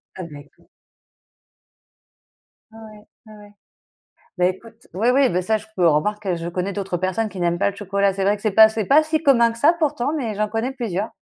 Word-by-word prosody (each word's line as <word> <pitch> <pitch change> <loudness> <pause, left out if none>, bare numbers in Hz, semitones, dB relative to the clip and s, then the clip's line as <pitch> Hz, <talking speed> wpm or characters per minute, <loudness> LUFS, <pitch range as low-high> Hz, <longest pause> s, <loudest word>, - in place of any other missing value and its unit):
Ah, 185 - -7
d'accord. 145 -3 -14 2.0
Ouais, 225 - -15
ouais. 215 -1 -14 0.2
Ouais, 215 -1 -14
ouais. 205 0 -16 0.9
Bah, 180 - +3
écoute, 225 +5 -6
oui, 215 +6 0
oui, 275 -1 +4
beh, 180 - 0
ça 220 +4 +1
je 215 - -9
peux 180 -2 +2
remarque, 205 +8 -1
heu, 180 -2 0
je 170 0 -5
connais 180 +3 -3
d'autres 195 -3 -3
personnes 185 +5 -2
qui 185 -1 -8
n'aiment 175 0 0
pas 200 - +1
le 200 - -15
chocolat, 200 0 0
c'est 195 +1 -4
vrai 205 +1 +2
que 205 - -16
c'est 215 - 0
pas 220 +2 +7
c'est 220 -1 -3
pas 295 +7 +4
si 315 0 -2
commun 235 -6 +4
que 230 - -11
ça 295 +7 +5
pourtant, 295 -4 -1
mais 240 -8 -3
j'en 210 +1 -1
connais 225 +5 -3
plusieurs 220 -5 -3
210 Hz, 220 wpm, -21 LUFS, 185-230 Hz, 2.0 s, pas